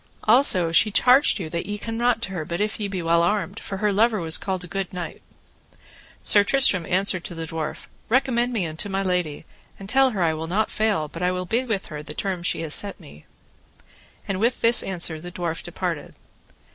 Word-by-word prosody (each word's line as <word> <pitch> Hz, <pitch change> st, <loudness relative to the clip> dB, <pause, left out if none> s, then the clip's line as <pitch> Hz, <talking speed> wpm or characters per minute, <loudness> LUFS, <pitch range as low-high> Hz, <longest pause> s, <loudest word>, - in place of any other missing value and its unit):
Also 215 Hz, -8 st, +4 dB
she 215 Hz, +6 st, +5 dB
charged 250 Hz, +6 st, +5 dB
you 180 Hz, -6 st, -4 dB
that 170 Hz, +2 st, -4 dB
ye 205 Hz, 0 st, -3 dB
come 225 Hz, +2 st, -5 dB
not 235 Hz, 0 st, +1 dB
to 190 Hz, -, -3 dB
her 175 Hz, -4 st, -3 dB
but 170 Hz, +3 st, -4 dB
if 210 Hz, +1 st, -1 dB
ye 210 Hz, -, -2 dB
be 190 Hz, -3 st, -4 dB
well 170 Hz, 0 st, +3 dB
armed, 200 Hz, +3 st, 0 dB
for 195 Hz, -, -6 dB
her 210 Hz, +1 st, +1 dB
lover 220 Hz, +1 st, +3 dB
was 160 Hz, -2 st, 0 dB
called 190 Hz, -2 st, -3 dB
a -, -, -9 dB
good 195 Hz, 0 st, -4 dB
knight. 180 Hz, -2 st, -6 dB, 1.0 s
Sir 205 Hz, -, +6 dB
Tristram 205 Hz, -, +3 dB
answered 185 Hz, -1 st, +1 dB
to 175 Hz, -, -7 dB
the 165 Hz, 0 st, -5 dB
dwarf: 160 Hz, -2 st, -5 dB, 0.2 s
Recommend 245 Hz, 0 st, +2 dB
me 215 Hz, -7 st, -1 dB
unto 160 Hz, +6 st, -2 dB
my 195 Hz, 0 st, -1 dB
lady, 180 Hz, -5 st, -1 dB, 0.3 s
and 195 Hz, -, -10 dB
tell 265 Hz, +4 st, +4 dB
her 200 Hz, -7 st, -1 dB
I 160 Hz, -1 st, +2 dB
will 160 Hz, +1 st, -5 dB
not 205 Hz, +6 st, 0 dB
fail 210 Hz, -8 st, 0 dB
but 165 Hz, +3 st, -9 dB
I 180 Hz, 0 st, +2 dB
will 180 Hz, 0 st, -3 dB
be 235 Hz, +8 st, 0 dB
with 215 Hz, -5 st, -2 dB
her 150 Hz, -, -5 dB
the 150 Hz, -, -9 dB
term 190 Hz, -3 st, -2 dB
that 170 Hz, -, -9 dB
she -, -, 0 dB
hath 160 Hz, -2 st, -4 dB
set 200 Hz, -1 st, -4 dB
me. 75 Hz, +1 st, -15 dB, 1.0 s
And 195 Hz, -1 st, -2 dB
with 235 Hz, +4 st, +1 dB
this 230 Hz, +1 st, +5 dB
answer 170 Hz, -4 st, -3 dB
the 175 Hz, +1 st, -8 dB
dwarf 170 Hz, -2 st, -3 dB
departed. -, -, -4 dB
190 Hz, 220 wpm, -23 LUFS, 170-215 Hz, 1.0 s, Sir